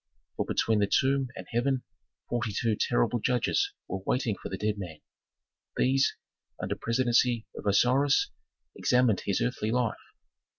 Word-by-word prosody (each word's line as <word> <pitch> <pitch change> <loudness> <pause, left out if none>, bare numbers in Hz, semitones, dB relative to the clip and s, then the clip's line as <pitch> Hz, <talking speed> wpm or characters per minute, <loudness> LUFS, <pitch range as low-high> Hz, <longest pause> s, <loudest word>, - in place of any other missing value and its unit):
For - - -1
between 110 -2 +1
the 100 - +2
tomb 135 0 +2
and - - -7
heaven 125 +2 0 0.4
forty 120 -2 -1
two 115 -2 +1
terrible 100 - +1
judges 125 - +1 0.2
were 95 - -4
waiting 120 -1 0
for - - -8
the 95 - -4
dead 105 0 -1
man; 85 -5 -7 0.8
these, 135 +1 +2 0.4
under - - -2
presidency 120 -1 +1
of - - -6
Osiris, 130 +7 +3 0.4
examined 125 -5 +3
his 100 - +1
earthly 120 -3 -1
life. 125 -1 0
120 Hz, 140 wpm, -28 LUFS, 105-130 Hz, 0.8 s, Osiris